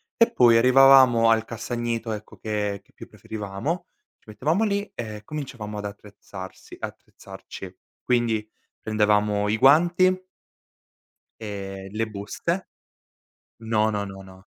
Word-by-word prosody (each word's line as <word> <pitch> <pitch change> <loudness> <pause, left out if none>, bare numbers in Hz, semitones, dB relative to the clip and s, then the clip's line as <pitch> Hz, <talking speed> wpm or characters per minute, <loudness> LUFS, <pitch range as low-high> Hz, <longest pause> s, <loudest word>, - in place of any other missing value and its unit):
e 230 - +4
poi 120 -2 +5
arrivavamo 130 -2 +7
al 115 -1 +3
castagneto, 115 0 -3
ecco, 105 0 -9
che 105 -2 -2
che - - -30
più - - -11
preferivamo, 110 - -5 0.3
ci - - -37
mettevamo 155 - 0
lì 205 -1 -1
e 105 -3 -6
cominciavamo 125 -8 -6
ad 105 - -6
attrezzarsi 100 -2 -10
attrezzarci. 95 -1 -10 0.2
Quindi, 115 -3 0 0.3
prendevamo 105 -1 +1
i 110 - +1
guanti 175 +7 +4 1.1
e 95 -2 -6
le 110 +1 -1
buste. 110 - -4 0.9
No, 110 -1 +1
no, 100 -1 -2
no, 95 0 -9
no. 95 0 -15
110 Hz, 120 wpm, -24 LUFS, 105-130 Hz, 1.1 s, arrivavamo